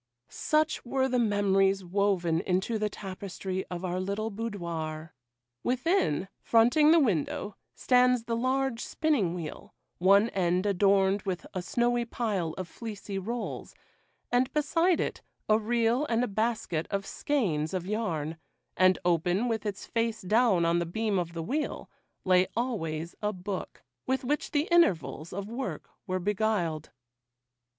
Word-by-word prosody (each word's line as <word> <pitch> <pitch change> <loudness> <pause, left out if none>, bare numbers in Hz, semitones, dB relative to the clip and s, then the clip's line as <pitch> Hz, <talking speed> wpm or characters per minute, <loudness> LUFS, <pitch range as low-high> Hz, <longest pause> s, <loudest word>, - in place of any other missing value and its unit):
Such 310 0 0
were 265 +1 0
the 250 -1 +1
memories 195 -3 +2
woven 180 -3 +1
into 190 +5 0
the 210 0 0
tapestry 190 -1 -5
of 180 +1 -4
our 180 0 -2
little 200 +4 -2
boudoir. 170 -7 -5 0.5
Within, 250 - +1
fronting 245 +7 +4
the 330 +1 +7
window, 205 - 0 0.2
stands 250 -1 +3
the 230 0 -2
large 260 0 0
spinning 250 - 0
wheel, 165 -4 -7 0.2
one 200 +5 +5
end 180 -1 +1
adorned 195 0 +3
with 185 -2 -4
a 185 - -2
snowy 240 +5 +1
pile 210 -9 -2
of 185 -2 -4
fleecy 205 -1 -6
rolls,—and 245 +3 -4
beside 330 +4 +2
it, - - -2 0.3
a 215 0 +4
reel 235 +5 +1
and 235 +1 +1
a - - 0
basket 215 -6 -1
of 200 0 -2
skeins 180 - -1
of 185 -2 -3
yarn,—and 180 -2 -1
open, 175 +6 +2
with 220 -2 -1
its 205 -1 -4
face 230 -2 -1
down 210 -3 +3
on 170 +1 +2
the 170 - -2
beam 210 +2 0
of 170 -1 -3
the 165 -1 -4
wheel, 290 - -3 0.3
lay 185 0 +4
always 170 -10 -2
a 210 0 0
book, 190 0 -6 0.2
with 265 0 0
which 290 +4 -1
the 295 +3 0
intervals 170 - +2
of 200 +2 -5
work 250 +4 -5 0.2
were 185 -1 0
beguiled. 190 -5 -1
205 Hz, 140 wpm, -29 LUFS, 180-235 Hz, 0.5 s, the